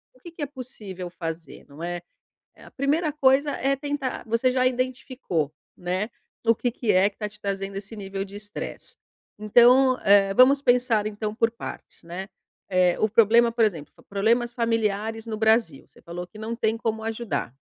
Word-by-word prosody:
o - - -23
que 340 +5 -11
que 335 - -11
é - - 0
possível 220 -10 -8
fazer, 165 -3 -7
não 145 +4 -11
é? 175 0 -3 0.5
Eh, - - -17
a - - -14
primeira 295 +3 0
coisa 280 0 +3
é 275 +1 0
tentar 285 -1 -3
você 230 +3 +2
já 255 0 +2
identificou, 255 - -2 0.2
né, 185 +5 -2 0.4
o 230 - +6
que 245 +2 -1
que 235 -1 0
é 190 +2 +4
que 200 - -31
tá 210 - -3
te 215 +1 -19
trazendo 195 -1 -4
esse 200 +3 -6
nível 195 -1 -4
de 200 +1 -11
estresse. 205 0 -7 0.4
Então, 245 +5 +5
eh, 195 -1 +5
vamos 275 +5 +6
pensar 245 -4 +3
então 210 0 -4
por 230 +1 +2
partes, 230 - -9
né. 180 +4 -6 0.4
Eh, 180 -1 +3
o 215 - +3
problema 230 +2 +5
por 230 -1 +3
exemplo, 165 -9 -2 0.2
problemas 230 +4 +1
familiares 225 -1 -1
no 220 -1 -4
Brasil, 220 - +2
você - - -21
falou 175 +1 -7
que 215 - -15
não 225 +2 -4
tem 220 -1 0
como 220 -1 -2
ajudar, 220 - -3
220 Hz, 185 wpm, -25 LUFS, 195-250 Hz, 0.5 s, o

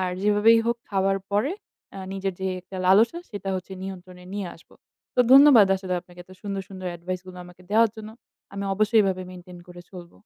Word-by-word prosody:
আর 185 -1 -1
যেভাবেই 210 +2 +5
হোক 235 - +1
খাওয়ার 195 0 +1
পরে 215 - +1 0.4
আ - - -7
নিজের 195 0 -3
যে 190 - -2
একটা 190 +1 -11
লালসা 225 - +4
সেটা 200 -2 -6
হচ্ছে 185 +1 -8
নিয়ন্ত্রণে 180 -1 -9
নিয়ে 200 -3 -3
আসব। 165 - -21 0.4
তো 250 - +3
ধন্যবাদ 270 -7 +8
আসলে 185 -1 -4
আপনাকে 175 0 -16
এত 185 - -23
সুন্দর, 200 -1 -4
সুন্দর 185 -1 -8
advice 180 +1 -5
গুলো 185 -1 -10
আমাকে 180 +1 -16
দেওয়ার 225 0 +4
জন্য। 215 0 -9 0.4
আমি 200 0 -4
অবশ্যই 215 +2 +3
এভাবে 185 -1 -1
maintain 180 -1 -12
করে 175 0 -11
চলব। 175 -2 -11
195 Hz, 195 wpm, -24 LUFS, 180-210 Hz, 0.4 s, ধন্যবাদ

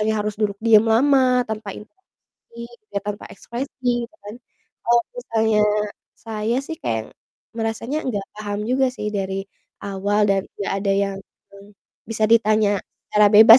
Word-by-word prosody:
kayak 220 +1 +1
harus 210 -1 -2
duduk 205 -2 +1
diam 225 -1 +6
lama, 255 +1 +4
tanpa 215 -2 -4
interaksi, 235 - -17 0.5
tanpa 205 0 -4
ekspresi, 240 +1 -3
gitu 320 - -26
kan. 205 +2 -7 0.5
Kalau 235 0 +4
misalnya, 220 - +1 0.6
saya 225 +1 -2
sih 325 - -4
kayak 110 -1 -2 0.4
merasanya 225 +6 -2
nggak 205 -6 -2
paham 205 -1 -4
juga 265 +1 +3
sih 210 -4 -4
dari 195 0 -2 0.4
awal, 200 +1 0
dan 195 -1 +2 0.2
nggak 200 - -2
ada 200 - +1
yang, 195 -1 -4 0.4
eee, 200 +1 -14 0.4
bisa 220 -1 +1
ditanya 215 -3 +4 0.3
secara 210 0 +5
bebas 220 +3 +11
220 Hz, 140 wpm, -22 LUFS, 205-235 Hz, 0.6 s, bebas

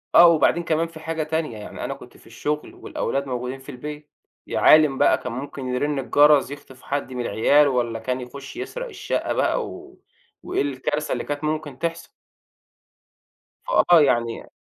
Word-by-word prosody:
آه، 175 - +10
وبعدين 170 +1 +3
كمان 165 0 0
في 165 -1 -12
حاجة 160 0 -3
تانية، 155 -7 -2
يعني 105 - -8
أنا - - -3
كنت - - -14
في - - -20
الشُغل 150 0 -4
والأولاد 140 0 -3
موجودين 125 +1 -4
في 135 - -14
البيت، 150 +3 -8 0.4
يا - - -2
عالِم 155 -3 +6
بقى - - +4
كان 125 - -6
ممكن 135 +1 -6
يرِن 145 +2 0
الجرس 145 +1 +4
يخطف 135 -2 -11
حد 140 -2 -3
من 125 - -3
العيال 145 +7 +4
والّا 120 -4 -1
كان 125 +2 -3
يخُش 140 +3 -9
يسرق - - -5
الشَقّة - - -2
بَقى - - +1
و 370 0 -11 0.4
وإيه - - -1
الكارثة 145 +2 -2
اللي - - -1
كانت 145 +1 -4
ممكن 150 -3 -3
تحصل. 165 0 -3 1.6
فآه، 175 - +5
يعني 120 -4 +1
145 Hz, 170 wpm, -23 LUFS, 130-155 Hz, 1.6 s, آه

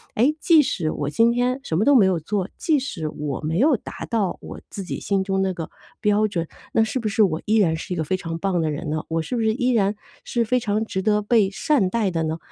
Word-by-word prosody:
哎， 260 +8 +3
即 320 -3 +6
使 165 - -1
我 145 0 -3
今 230 +4 +4
天 245 +2 0
什 160 - -2
么 210 - +2
都 285 - +5
没 200 -6 +6
有 180 -3 +1
做， 195 +4 -2
即 310 -3 +2
使 180 - -4
我 150 -3 -4
没 160 +4 -1
有 280 -1 +4
达 - - -8
到 210 -6 0
我 - - -9
自 195 - -6
己 - - -5
心 195 -1 0
中 195 0 0
那 190 -1 0
个 165 -2 -6 0.3
标 210 0 +3
准， 170 -5 -3 0.3
那 225 - +4
是 225 +4 -2
不 220 - -2
是 215 +1 +1
我 165 -6 +3
依 220 +1 +2
然 170 -6 +3
是 165 +3 -5
一 175 - -4
个 160 - 0
非 185 +5 -1
常 165 -2 -5
棒 185 -1 0
的 155 -1 0
人 145 - -4
呢？ 155 0 -2
我 165 0 -1
是 245 - -4
不 230 - 0
是 220 -1 +2
依 250 +1 +1
然 210 -2 +2 0.3
是 240 - 0
非 250 +3 +2
常 215 -1 -1
值 190 - -3
得 210 +1 +2
被 210 -2 +3
善 200 0 +1
待 215 -2 0
的 165 -1 -1
呢？ 160 +1 -2
205 Hz, 290 characters per minute, -23 LUFS, 165-230 Hz, 0.3 s, 即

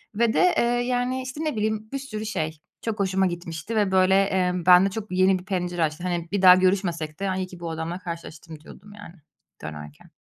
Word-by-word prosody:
ve 230 +1 +2
de, 360 -1 +4
eee, - - +3 0.2
yani, 250 +1 -1
işte, 260 +4 -6
ne 305 -5 -2
bileyim, 215 0 -2
bir 275 - -3
sürü 220 -6 -6
şey, 160 -7 -3 0.2
çok 225 -2 -4
hoşuma 190 -1 +1
gitmişti 175 +3 -5
ve, 205 -3 +1
böyle, 190 0 +4
eee, 190 -2 +2
bende 180 +2 +7
çok 210 0 -7
yeni 185 +1 +3
bir 180 - -14
pencere 180 -3 -2
açtı. 155 +2 -2
Hani, 175 -2 -2
bir 200 - 0
daha 180 -1 +9
görüşmesek 185 -4 0
de, 195 - -2
hani, 190 0 -1
iyi - - -6
ki 180 -1 -12
bu 170 -1 -5
adamla 165 +2 -4
karşılaştım 165 -3 -8
diyordum, 200 +6 -14
yani, 205 -4 -12 0.5
dönerken. 75 -1 -9
185 Hz, 210 wpm, -24 LUFS, 170-210 Hz, 0.5 s, daha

